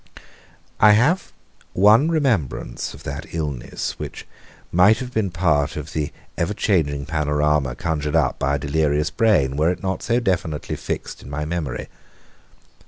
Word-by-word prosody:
I 105 Hz, 0 st, +7 dB
have 145 Hz, -, +2 dB, 0.4 s
one 110 Hz, -, +5 dB
remembrance 120 Hz, -, -1 dB
of -, -, -14 dB
that 70 Hz, +4 st, -6 dB
illness, 75 Hz, -6 st, -4 dB
which -, -, -7 dB, 0.5 s
might 95 Hz, +6 st, +5 dB
have 125 Hz, +1 st, -6 dB
been 110 Hz, -3 st, 0 dB
part 80 Hz, -5 st, +1 dB
of 75 Hz, +2 st, -6 dB
the 75 Hz, -2 st, -2 dB, 0.3 s
ever 90 Hz, +5 st, 0 dB
changing 70 Hz, -10 st, +1 dB
panorama 75 Hz, -3 st, +1 dB
conjured 75 Hz, -1 st, -2 dB
up -, -, +2 dB
by 70 Hz, 0 st, +1 dB
a -, -, 0 dB
delirious 75 Hz, +1 st, 0 dB
brain 95 Hz, -, +2 dB
were 80 Hz, +2 st, +3 dB
it 90 Hz, -, -3 dB
not 95 Hz, 0 st, -2 dB
so 120 Hz, +1 st, +1 dB
definitely 90 Hz, -8 st, -1 dB
fixed -, -, -5 dB
in -, -, -11 dB
my 75 Hz, +1 st, -3 dB
memory. 80 Hz, -5 st, -3 dB
80 Hz, 150 wpm, -22 LUFS, 75-105 Hz, 0.5 s, I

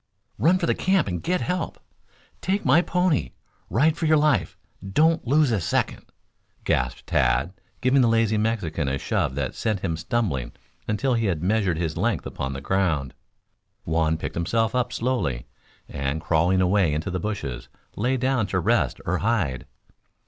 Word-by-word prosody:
"Run 175 Hz, +4 st, +4 dB
to 180 Hz, -, -1 dB
the -, -, +2 dB
camp 190 Hz, -, +1 dB
and 90 Hz, -3 st, -3 dB
get 180 Hz, +1 st, 0 dB
help! 180 Hz, 0 st, -2 dB, 0.6 s
Take 195 Hz, +2 st, -1 dB
my 170 Hz, -, +5 dB
pony! 180 Hz, -, 0 dB, 0.4 s
Ride 150 Hz, -, +3 dB
for 160 Hz, -, -1 dB
your 155 Hz, 0 st, +5 dB
life! 150 Hz, -, +1 dB, 0.3 s
Don't 155 Hz, -, +2 dB
lose 145 Hz, 0 st, +3 dB
a 105 Hz, -5 st, +1 dB
second!" -, -, -1 dB, 0.6 s
gasped 60 Hz, -1 st, -1 dB
Tad, 65 Hz, +8 st, +1 dB, 0.3 s
giving 130 Hz, +2 st, +4 dB
the 120 Hz, -, +4 dB
lazy 115 Hz, -1 st, +2 dB
Mexican 90 Hz, -9 st, -1 dB
a 70 Hz, 0 st, 0 dB
shove 65 Hz, -, -1 dB
that 70 Hz, -2 st, -2 dB
sent 105 Hz, -4 st, -2 dB
him 85 Hz, -4 st, -1 dB
stumbling 85 Hz, -, -2 dB, 0.3 s
until 125 Hz, +5 st, 0 dB
he 115 Hz, -2 st, +1 dB
had 85 Hz, -4 st, -1 dB
measured 95 Hz, -3 st, +1 dB
his 80 Hz, -2 st, -2 dB
length -, -, 0 dB
upon 65 Hz, 0 st, -4 dB
the 70 Hz, -, -6 dB
ground. 80 Hz, -7 st, 0 dB, 0.7 s
Juan 80 Hz, 0 st, +1 dB
picked -, -, -5 dB
himself 110 Hz, +6 st, 0 dB
up 125 Hz, -1 st, 0 dB
slowly; 115 Hz, -, -1 dB, 0.4 s
and, 70 Hz, +2 st, -3 dB
crawling 85 Hz, +4 st, +2 dB
away 90 Hz, -4 st, +2 dB
into 80 Hz, +5 st, -3 dB
the 90 Hz, -, -2 dB
bushes, 85 Hz, -, -4 dB, 0.3 s
lay 125 Hz, +5 st, 0 dB
down 130 Hz, -4 st, +1 dB
to 95 Hz, -, 0 dB
rest 115 Hz, +7 st, +1 dB
or 90 Hz, +1 st, 0 dB
hide. 90 Hz, -, -1 dB
100 Hz, 165 wpm, -24 LUFS, 80-130 Hz, 0.7 s, my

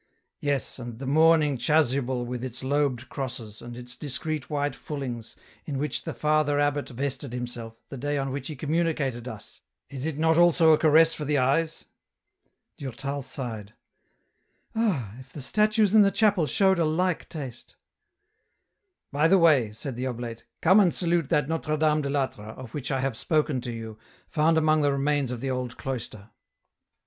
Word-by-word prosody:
" -, -, -52 dB
Yes, 140 Hz, -2 st, -1 dB
and 120 Hz, -2 st, -7 dB
the 135 Hz, -, -6 dB
mourning 155 Hz, -1 st, +4 dB
chasuble 130 Hz, -3 st, +1 dB
with 125 Hz, 0 st, -5 dB
its 130 Hz, 0 st, -6 dB
lobed 130 Hz, -3 st, 0 dB
crosses, 120 Hz, -6 st, -6 dB
and 120 Hz, 0 st, -8 dB
its 125 Hz, 0 st, -8 dB
discreet 150 Hz, +1 st, -4 dB
white 145 Hz, -1 st, -1 dB
fullings, 125 Hz, -6 st, -6 dB, 0.3 s
in 140 Hz, -3 st, -3 dB
which 130 Hz, -4 st, -3 dB
the -, -, -3 dB
Father 150 Hz, -1 st, +2 dB
abbot 145 Hz, 0 st, 0 dB
vested 135 Hz, 0 st, -4 dB
himself, 120 Hz, -2 st, -5 dB
the 135 Hz, -, -7 dB
day 145 Hz, +2 st, -1 dB
on 135 Hz, -1 st, -2 dB
which 135 Hz, -1 st, -4 dB
he 155 Hz, -, -5 dB
communicated 145 Hz, -5 st, -1 dB
us, 110 Hz, -4 st, -9 dB, 0.3 s
is 135 Hz, 0 st, -4 dB
not 160 Hz, +1 st, +3 dB
it -, -, +5 dB
also 170 Hz, -2 st, +6 dB
a 155 Hz, -, +6 dB
caress 160 Hz, +1 st, +5 dB
for 150 Hz, -, -5 dB
the 150 Hz, 0 st, +1 dB
eyes? 155 Hz, +5 st, +1 dB, 0.5 s
" -, -, -48 dB
Durtal 140 Hz, +1 st, -4 dB
sighed: 115 Hz, -6 st, -6 dB, 0.5 s
" -, -, -44 dB
Ah! 170 Hz, -, 0 dB
if 130 Hz, 0 st, -14 dB
the -, -, -8 dB
statues 215 Hz, -, +2 dB
in 215 Hz, -, +8 dB
the 200 Hz, -, +6 dB
chapel 200 Hz, -6 st, +2 dB
showed 190 Hz, 0 st, +3 dB
a -, -, +4 dB
like 175 Hz, +3 st, 0 dB
taste! 135 Hz, -7 st, -8 dB, 0.5 s
" 435 Hz, +1 st, -48 dB
" 390 Hz, -3 st, -55 dB
By 150 Hz, +3 st, +3 dB
the 195 Hz, -, +6 dB
way," 150 Hz, -, +4 dB
said 120 Hz, +4 st, -5 dB
the 130 Hz, +1 st, -2 dB
oblate, 120 Hz, -2 st, -6 dB
" -, -, -54 dB
come 185 Hz, +5 st, +7 dB
and 185 Hz, -4 st, +5 dB
salute 170 Hz, -4 st, +1 dB
that 150 Hz, -2 st, +2 dB
Notre 160 Hz, -1 st, -1 dB
Dame 155 Hz, 0 st, +2 dB
de 140 Hz, -, -3 dB
I'Atre, 130 Hz, -6 st, -3 dB
of 130 Hz, -3 st, -10 dB
which 145 Hz, -2 st, -4 dB
I 135 Hz, -2 st, 0 dB
have 135 Hz, -3 st, -1 dB
spoken 150 Hz, 0 st, 0 dB
to 120 Hz, 0 st, -5 dB
you, 110 Hz, -2 st, -7 dB, 0.3 s
found 160 Hz, +1 st, +2 dB
among 155 Hz, -1 st, +3 dB
the 145 Hz, -1 st, +3 dB
remains 140 Hz, -1 st, 0 dB
of 120 Hz, -2 st, -5 dB
the 135 Hz, -, -1 dB
old 125 Hz, -1 st, -3 dB
cloister. 110 Hz, -5 st, -6 dB
140 Hz, 190 wpm, -26 LUFS, 125-155 Hz, 0.5 s, in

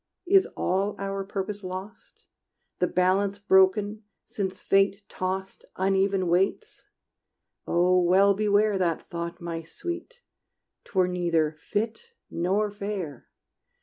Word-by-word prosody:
Is 385 Hz, +1 st, +5 dB
all 195 Hz, +3 st, 0 dB
our 195 Hz, 0 st, -3 dB
purpose 200 Hz, +1 st, -5 dB
lost? 185 Hz, +4 st, -8 dB, 0.5 s
The 180 Hz, -, +2 dB
balance 190 Hz, +3 st, +1 dB
broken, 205 Hz, +1 st, +3 dB, 0.2 s
since 190 Hz, -2 st, -4 dB
Fate 195 Hz, +1 st, +2 dB
tossed 190 Hz, +1 st, -4 dB
Uneven 195 Hz, 0 st, +1 dB
weights? 190 Hz, -, 0 dB, 0.8 s
Oh 180 Hz, +1 st, +3 dB
well 190 Hz, +3 st, +5 dB
beware 205 Hz, 0 st, +2 dB
That 170 Hz, -3 st, 0 dB
thought, 170 Hz, 0 st, -5 dB
my 170 Hz, -2 st, -4 dB
sweet: 350 Hz, -, -7 dB, 0.6 s
't -, -, -20 dB
were 185 Hz, -1 st, +4 dB
neither 170 Hz, -4 st, 0 dB
fit 225 Hz, -, -3 dB, 0.2 s
nor 195 Hz, +5 st, 0 dB
fair! 200 Hz, -, -5 dB
195 Hz, 115 wpm, -26 LUFS, 180-205 Hz, 0.8 s, Is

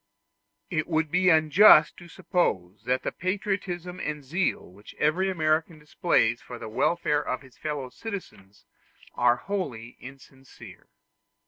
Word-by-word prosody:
It 155 Hz, -3 st, -1 dB
would 160 Hz, -2 st, 0 dB
be 180 Hz, +1 st, +3 dB
unjust 155 Hz, 0 st, +6 dB
to 175 Hz, -, -12 dB
suppose 105 Hz, -, -2 dB
that 130 Hz, +1 st, 0 dB
the -, -, -2 dB
patriotism 185 Hz, -2 st, -3 dB
and 150 Hz, -4 st, -4 dB
the -, -, -21 dB
zeal 175 Hz, +7 st, -1 dB
which 100 Hz, +3 st, -15 dB
every 175 Hz, +6 st, +1 dB
American 160 Hz, -2 st, 0 dB
displays 150 Hz, -6 st, 0 dB
for 125 Hz, -, -9 dB
the 115 Hz, -2 st, -8 dB
welfare 150 Hz, +5 st, +1 dB
of 130 Hz, -1 st, -4 dB
his 130 Hz, -1 st, -18 dB
fellow 145 Hz, -4 st, -4 dB
citizens 180 Hz, -, -9 dB, 0.5 s
are 120 Hz, 0 st, +3 dB
wholly 125 Hz, -, -5 dB
insincere. 135 Hz, 0 st, -14 dB
155 Hz, 135 wpm, -26 LUFS, 125-180 Hz, 0.5 s, unjust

